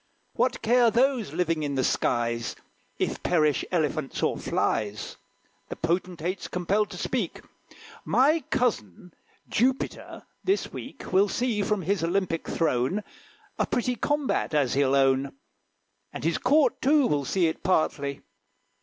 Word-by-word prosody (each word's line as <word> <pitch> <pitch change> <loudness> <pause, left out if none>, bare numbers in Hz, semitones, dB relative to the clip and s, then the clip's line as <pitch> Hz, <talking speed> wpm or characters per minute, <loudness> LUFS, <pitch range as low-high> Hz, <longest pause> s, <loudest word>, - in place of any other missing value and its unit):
What - - 0
care 240 +1 +5
those 245 - +1
living 165 -1 0
in 145 -2 -2
the 130 - +1
skies 115 -1 0 0.4
If - - -2
perish 155 -5 +2
Elephants 155 -5 -1
or - - +2
flies? 105 0 -2 0.5
The - - -5
potentate's 175 +1 -2
compelled 195 +4 0
to - - -8
speak: - - -2 0.6
"My 300 +4 +3
cousin, 180 - -1 0.3
Jupiter, 260 +4 -1 0.2
this 390 +2 0
week - - -8
Will 195 +2 +4
see, 235 -2 0
from 200 -1 0
his 190 0 0
Olympic 170 -1 -1
throne, 155 +5 0 0.6
A - - +1
pretty 245 0 0
combat, 290 - -1
as 140 -5 +2
he'll 140 0 +2
own; 135 0 +2 0.8
And - - -7
his 165 +1 +1
Court, 285 +4 +3
too, 285 +1 +4
will 145 -9 +1
see 175 +6 +1
it 160 - -1
partly." 145 -5 0
175 Hz, 135 wpm, -26 LUFS, 145-235 Hz, 0.8 s, care